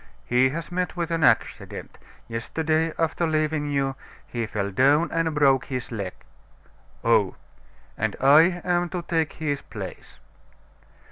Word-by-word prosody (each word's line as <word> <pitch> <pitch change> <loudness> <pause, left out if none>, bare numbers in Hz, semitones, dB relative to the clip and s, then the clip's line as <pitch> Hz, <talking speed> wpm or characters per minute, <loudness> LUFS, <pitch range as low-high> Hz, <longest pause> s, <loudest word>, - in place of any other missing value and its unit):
"He 125 +2 +3
has 165 +5 -5
met 180 0 -2
with 170 -1 -2
an 165 -1 0
accident. - - 0 0.3
Yesterday, 155 +8 -1
after 165 +1 0
leaving 155 -1 0
you, 135 -1 0 0.3
he 115 -2 -3
fell 100 -2 -2
down 140 - +3
and 165 -1 0
broke 135 -3 +4
his 125 -3 -5
leg." 100 -5 -4 0.9
"Oh!" - - +3 0.6
"And 110 -1 0
I 160 +6 +5
am 175 -1 +1
to 175 -1 -4
take 165 -2 0
his 145 -3 -2
place." - - -9
155 Hz, 135 wpm, -25 LUFS, 130-165 Hz, 0.9 s, I